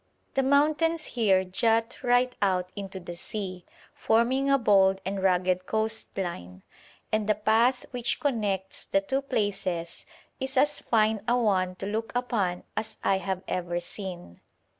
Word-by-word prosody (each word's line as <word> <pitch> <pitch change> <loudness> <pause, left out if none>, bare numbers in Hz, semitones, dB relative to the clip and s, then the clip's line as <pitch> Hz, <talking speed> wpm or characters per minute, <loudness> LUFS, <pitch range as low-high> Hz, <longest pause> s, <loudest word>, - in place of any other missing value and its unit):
The 270 - +2
mountains 305 +4 +2
here 195 -6 +3
jut 225 +5 0
right 245 +1 +2
out 185 -2 +1
into 195 -2 -6
the 175 -1 -8
sea, 185 -1 -5 0.3
forming 255 +5 +2
a 275 - +5
bold 195 -5 +4
and 195 +1 -2
rugged 185 -1 +1
coast 220 -1 -2
line, 90 - -5 0.5
and 215 -1 0
the 215 - +4
path 225 +5 +2
which 245 -1 -1
connects 205 -8 -1
the 195 - +1
two 265 +8 -1
places 195 -9 -2 0.3
is 265 0 -3
as 290 +2 +3
fine 220 -2 +2
a 245 - +3
one 185 -6 +1
to 190 - -6
look 220 +2 -3
upon 215 -8 -1
as 220 0 -4
I 195 -1 +2
have 190 -1 -3
ever 175 -1 -2
seen. 175 - -7
210 Hz, 150 wpm, -27 LUFS, 185-240 Hz, 0.5 s, a